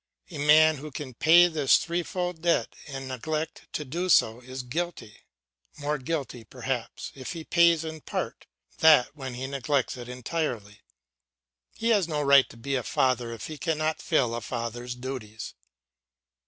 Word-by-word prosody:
A 155 - -7
man 155 +1 +6
who 150 +3 -8
can 140 -2 -7
pay 170 +8 +6
this 155 -5 +4
threefold 175 0 -3
debt 170 0 +1
and 135 -2 -6
neglect 155 +5 -4
to 150 - -3
do 175 +7 -3
so 110 -8 +4
is 130 +1 -7
guilty, 160 -3 -5 0.6
more 150 0 -2
guilty, 135 -4 -4
perhaps, 125 +2 -5
if 130 +4 -6
he 165 -2 -7
pays 170 -1 +4
it 160 - -4
in 160 -1 -9
part - - -5 0.3
than 155 -6 +7
when 135 -4 -7
he 130 +2 -4
neglects 135 -1 -1
it 120 0 -8
entirely. 125 -5 -4 1.0
He 230 - 0
has 205 -6 +3
no 150 -3 -1
right 140 -1 +6
to - - -14
be 140 +4 -4
a 130 - +1
father 125 -1 0
if 115 - -7
he 155 -2 -7
cannot 155 -1 -1
fulfil 135 -9 +1
a 120 - -3
father's 120 +1 -4
duties. 125 -4 -7
140 Hz, 165 wpm, -27 LUFS, 125-160 Hz, 1.0 s, than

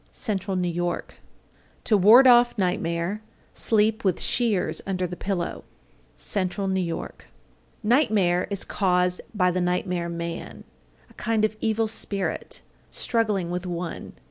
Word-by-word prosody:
Central 195 -4 -2
New 180 - 0
York. 175 0 -3 0.7
826. - - -2
To 215 - +5
ward 220 +8 +8
off 240 -1 +6
nightmare, 180 +1 -1 0.3
sleep 220 0 +1
with 190 -4 +1
shears 195 -9 0
under 185 -1 -1
the 180 0 -5
pillow. 180 -2 -3 0.5
Central 195 0 -2
New 190 0 0
York. 170 -2 -5 0.6
827. - - -2
Nightmare 210 - +3
is 200 -2 -1
caused 180 -2 +1
by 180 -2 +3
the 180 +1 -1
nightmare 180 -1 -1
man, 170 0 -6 0.4
a - - -21
kind 220 -1 0
of 215 - -2
evil 225 0 +1
spirit, 205 -2 -3 0.3
struggling 210 -7 -1
with 180 +1 -3
one. 175 -1 -5
190 Hz, 140 wpm, -25 LUFS, 180-215 Hz, 0.7 s, ward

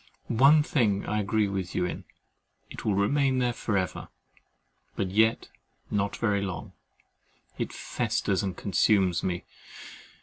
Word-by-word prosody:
One 140 +6 +6
thing 110 -10 +1
I 105 - -1
agree 105 +1 +1
with 95 -2 -4
you 90 - +1
in, - - -5 0.7
it - - -8
will 105 - +1
remain 130 +6 +2
there 125 -1 +1
for 110 -2 -1
ever; 90 -3 -3 0.9
but 95 -2 -2
yet 110 +3 +2 0.4
not 100 -1 0
very 105 -3 +1
long. 95 -2 -5 0.9
It - - -2
festers, 100 0 -1
and 95 -4 -4
consumes 95 -2 +2
me. 90 -1 -2
100 Hz, 135 wpm, -27 LUFS, 95-115 Hz, 0.9 s, One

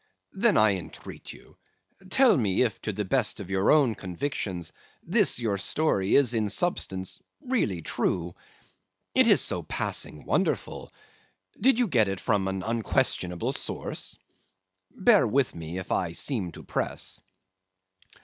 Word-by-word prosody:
"'Then - - +3
I 105 -3 +4
entreat 90 - -9
you, - - -16 0.5
tell 260 0 +5
me 105 -4 +2
if 105 -7 -2
to 110 - -3
the 105 +1 -3
best 120 +2 +2
of 95 -2 -8
your 95 0 +1
own 145 -7 +4
convictions, 95 - -4 0.3
this - - +2
your 110 -5 -1
story 100 -8 +1
is 130 -4 +4
in 110 -3 0
substance 95 - -1 0.2
really 225 - -1
true? 85 +1 -1 0.8
It - - +5
is - - +6
so - - -1
passing 75 - -2
wonderful! - - -1 0.7
Did 255 +2 +4
you 245 -2 +2
get 115 - +3
it 95 -1 -3
from 100 -3 0
an 95 -1 -3
unquestionable 95 -5 0
source? - - -2 0.7
Bear 210 - +4
with 130 +4 +1
me 85 +1 -7
if 95 - -6
I 85 -3 0
seem 100 -5 -2
to - - -11
press. - - -3
105 Hz, 140 wpm, -27 LUFS, 95-135 Hz, 0.8 s, is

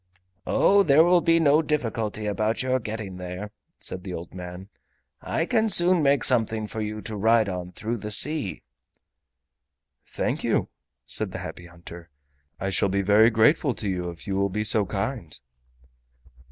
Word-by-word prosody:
"Oh, 200 0 +4
there 155 -3 +5
will 175 0 +4
be 165 0 +3
no 150 -1 +4
difficulty 115 -8 -2
about 110 +3 -1
your 130 0 0
getting 105 -4 -6
there," 90 +3 -7 0.3
said 90 - -5
the 90 -2 -6
old 85 - -9
man; 90 +1 -9 0.5
"I 165 - -2
can 225 +1 +1
soon 180 -2 +5
make 140 -2 +2
something 110 -3 +2
for 110 +1 -6
you 105 0 -5
to 110 - -6
ride 110 +1 +3
on 90 -2 -5
through 110 +6 -4
the 105 0 -7
sea." 140 +1 0 1.4
"Thank - - -3
you," - - 0 0.4
said - - -1
the - - -4
Happy 85 - -9
Hunter, 85 0 -13 0.5
"I 95 +1 -2
shall 100 0 +1
be 100 +1 0
very 105 +3 +5
grateful 120 +5 +2
to 105 - -1
you 90 -2 -2
if 85 -1 -10
you 100 -2 -3
will 100 0 +1
be 105 +3 -2
so 105 -2 +3
kind." 95 - -4
110 Hz, 165 wpm, -25 LUFS, 95-130 Hz, 1.4 s, there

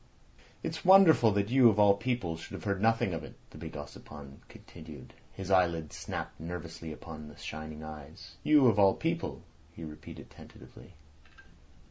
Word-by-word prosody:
"It's - - -5
wonderful 185 - +7
that 100 +2 -1
you 130 -2 +7
of 105 - 0
all 105 -1 +6
people 100 -5 -2
should 80 - -11
have - - -8
heard 100 -2 -2
nothing 115 -3 +2
of 80 -1 -4
it," - - -11 0.2
the - - -12
big 80 0 -8
Ossipon 75 -1 -11
continued. 75 -6 -13 0.2
His 95 0 -7
eyelids 85 -5 +1
snapped - - -6
nervously 85 0 -7
upon 75 0 -9
the 75 - -14
shining 80 0 -8
eyes. 75 +2 -11
"You 150 -3 +5
of 110 -4 +4
all 95 -1 +5
people," 165 - -3 0.3
he 85 - -9
repeated 75 -1 -10
tentatively. 90 - -15
85 Hz, 160 wpm, -30 LUFS, 80-110 Hz, 0.3 s, wonderful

